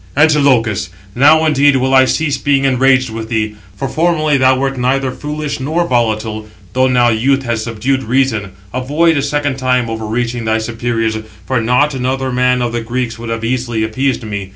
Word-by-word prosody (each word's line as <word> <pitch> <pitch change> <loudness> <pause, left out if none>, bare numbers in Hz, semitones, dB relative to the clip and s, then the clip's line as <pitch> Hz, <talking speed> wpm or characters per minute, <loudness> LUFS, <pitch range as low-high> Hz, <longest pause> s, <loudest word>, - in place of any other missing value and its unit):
"Antilochus, 140 - +3 0.2
now 155 +5 +5
indeed 145 -2 +3
will 130 0 +1
I 130 0 +6
cease 145 0 -1
being 140 -1 +1
enraged 130 -1 +2
with 110 0 -6
thee, 110 -2 -1 0.2
for 135 - -3
formerly 155 -1 +1
thou 130 -1 +3
wert 135 0 -1
neither 130 +1 0
foolish 150 +1 -5
nor 160 +6 -1
volatile; 110 -3 -1 0.3
though 130 0 +3
now 125 -2 +3
youth 135 +5 +1
has 115 -3 -2
subdued 120 +4 -1
reason. 115 -5 0 0.2
Avoid 150 +6 +1
a 140 - +1
second 145 -1 -1
time 125 -3 0
overreaching 115 +2 -3
thy 110 0 +1
superiors; 115 -1 -2 0.3
for 130 -3 0
not 125 +6 +2
another 130 0 -2
man 125 0 +1
of 120 -1 -2
the 120 - -2
Greeks 120 0 -3
would 115 0 -6
have 115 0 -3
easily 120 -2 -1
appeased 130 +4 -1
me. 100 -3 -5
130 Hz, 175 wpm, -15 LUFS, 115-135 Hz, 0.3 s, I